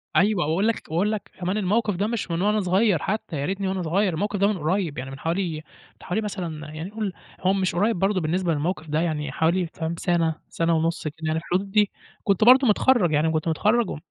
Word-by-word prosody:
أيوه 200 -2 +3
وأقول 170 +8 +1
لك 230 - 0
وأقول 180 +7 +1
لك 215 -2 -5
كمان 185 +3 -1
الموقف 210 +1 +1
ده 200 +4 0
مش 225 -6 -3
من 165 +1 -1
وأنا 210 +2 +2
صغيّر 190 0 +2
حتى 210 -4 -3
ياريتني 190 +7 -2
وأنا 190 0 -1
صغيّر، 180 +3 +1
الموقف 200 +4 -2
ده 200 - +4
من 210 -1 0
قريّب، 165 0 -1
يعني 130 +1 -5
من 135 - -9
حوالي 170 +1 -1
من 155 - -7 0.4
حوالي 215 +5 -1
مثلًا 170 -7 -5
يعني 160 +4 -6
قُل 210 -2 -3 0.3
هو 185 +1 +2
مش 190 -2 0
قريّب 205 +2 +1
برضو 195 0 +1
بالنسبة 170 +2 0
للموقف 160 +2 -2
ده، 155 +1 0
يعني 150 -4 -2
حوالي 170 +5 +1
فاهم 165 +1 -3
سنة، 165 -3 +1
سنة 165 0 +1
ونُص 165 +1 -1
كده 150 - -4
يعني 155 0 0
الحدود 185 +4 -2
دي، 210 -1 +3 0.3
كنت 200 0 +2
برضو 255 +3 +7
متخرَّج، 215 -4 +3
يعني 155 +2 +2
كنت 155 +1 -1
متخرَّج، 210 +8 +2
و - - -4
185 Hz, 220 wpm, -24 LUFS, 160-205 Hz, 0.4 s, برضو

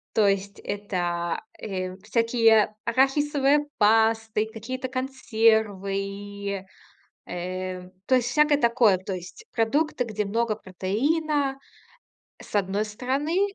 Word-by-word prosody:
То 210 -2 +5
есть 200 0 -1
это, 175 -4 -2 0.2
э, 185 -2 -4
всякие 225 -1 +3
арахисовые 280 +3 +2
пасты, 220 0 +3
какие-то 255 +4 -5
консервы, 205 -6 -1 0.6
э. 185 +1 -5 0.2
То 260 - +3
есть 245 -2 +2
всякое 300 +2 +4
такое. 235 -5 +4
То 190 +2 -6
есть 180 - -9
продукты, 250 +4 +1
где 215 -2 -2
много 220 +2 0
протеина, 270 - -1 0.8
с - - -5
одной 200 +1 +1
стороны, 290 - -1
220 Hz, 100 wpm, -25 LUFS, 195-260 Hz, 0.8 s, То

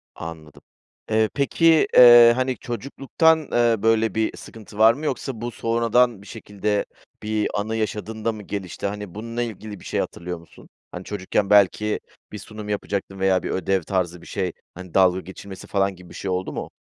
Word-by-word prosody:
Anladım. 80 -2 -9 0.5
Eee, 110 0 +3
peki, 160 +3 +3
eee, 120 -1 +9
hani, 130 0 -1
çocukluktan, 140 +7 +1
eee, 120 -1 +3
böyle, 115 -2 +2
bir 110 0 -1
sıkıntı 110 -2 -12
var 110 +1 +6
mı 150 +4 -7
yoksa 130 -4 -3
bu 120 0 -4
sonradan 115 -1 +1
bir 100 - -15
şekilde 105 -2 -3 0.4
bir 105 0 0
anı 105 +2 -2
yaşadığında 110 +1 -3
mı 105 -2 -9
gelişti? 95 -2 -6
Hani, 105 -2 -7
bununla 115 +2 -4
ilgili 110 -2 -7
bir - - -15
şey - - -2
hatırlıyor 90 0 -4
musun? 85 - -18 0.2
Hani, 90 +1 -7
çocukken 100 0 -2
belki 105 +1 +3 0.3
bir 105 - -6
sunum 105 0 -9
yapacaktın 100 -1 -3
veya 95 -1 +2
bir - - -4
ödev 95 0 0
tarzı 90 -2 -2
bir - - -14
şey, 95 -3 -2 0.2
hani, 90 -1 -11
dalga 95 -1 +4
geçilmesi 95 +1 -10
falan 100 -1 0
gibi 90 -1 -15
bir - - -13
şey 95 - -5
oldu 90 +1 -3
mu? - - -6
105 Hz, 180 wpm, -23 LUFS, 95-115 Hz, 0.5 s, eee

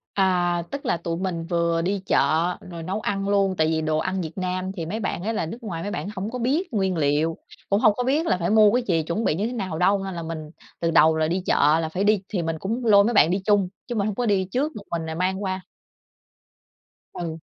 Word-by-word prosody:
À, 175 -3 +2
tức 280 0 -5
là, - - +1
tụi 165 0 -3
mình 175 -3 -3
vừa 170 -1 +1
đi 195 +3 -1
chợ - - +2 0.5
rồi 170 -2 -7
nấu 190 +5 -2
ăn 195 -1 -2
luôn. 195 -2 +2
Tại 155 0 +3
vì 160 0 0
đồ 155 0 0
ăn 185 +4 -1
Việt 160 -1 -5
Nam 185 0 -2
thì 175 -4 -5
mấy 205 +7 -3
bạn 185 -4 -3
ấy 225 - -1
là 190 - -1
nước 230 +9 -8
ngoài 170 -7 -4
mấy 205 - -4
bạn 195 - -4
hổng 200 +4 -4
có 250 - -4
biết 275 +6 0
nguyên 190 -3 0
liệu, 155 +2 +1 0.3
cũng 200 +1 +3
hông 215 -2 +5
có 250 - 0
biết 290 +6 +1
là 185 - +2
phải 175 0 -1
mua 215 -1 +6
cái 245 +1 +1
gì, 165 -3 +2
chuẩn 170 +8 -2
bị 150 - +1
như 200 +6 -1
thế 245 - -5
nào 190 -8 -3
đâu. 195 +2 +3
Nên 195 - -4
là 170 - -4
mình 160 -1 -6 0.3
từ 165 0 0
đầu 160 0 +5
là 155 - +1
đi 180 +3 -1
chợ 150 +3 +4
là 160 - -2
phải 180 +5 -2
đi 210 -2 +3
thì 190 -5 -1
mình 165 -1 -3
cũng 230 +5 -3
lôi 200 -3 +7
mấy 235 +4 +1
bạn 170 -5 +5
đi 190 - +1
chung, 205 -3 +3 0.2
chứ 240 - -4
mình 205 0 0
hông 205 - -2
có 245 - -1
đi 195 -4 +2
trước 290 +5 0 0.2
mình 165 -1 -2
rồi 160 0 -4
mang 190 +3 -1
qua. 185 0 -2 1.5
Ừ. 165 -2 -5
185 Hz, 265 wpm, -24 LUFS, 165-205 Hz, 1.5 s, lôi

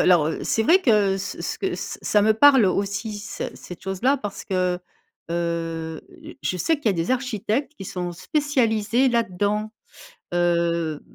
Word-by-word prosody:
alors, 165 -4 +4
c'est 225 - +1
vrai 345 - +5
que 210 - +3
ce 195 - -5
ce - - -3
que - - -1
ce - - -6
ça 210 - +3
me 220 +1 +5
parle 265 +1 +7
aussi, 200 +3 -1
c 220 +2 -5
cette 180 - -11
chose 190 -1 -4
là, 270 +3 +4
parce 205 -5 -6
que, 180 -2 0 0.5
heu, 165 -1 -2 0.4
je 185 - -1
sais 320 - +2
qu'il 290 - -11
y - - +7
a - - +2
des 170 +2 -2
architectes 250 +1 -1
qui - - -8
sont 180 -1 -4
spécialisés 240 - +1
là 235 -1 +3
dedans, 210 +2 -2 0.6
heu, 170 -3 +1
200 Hz, 170 wpm, -23 LUFS, 175-230 Hz, 0.6 s, parle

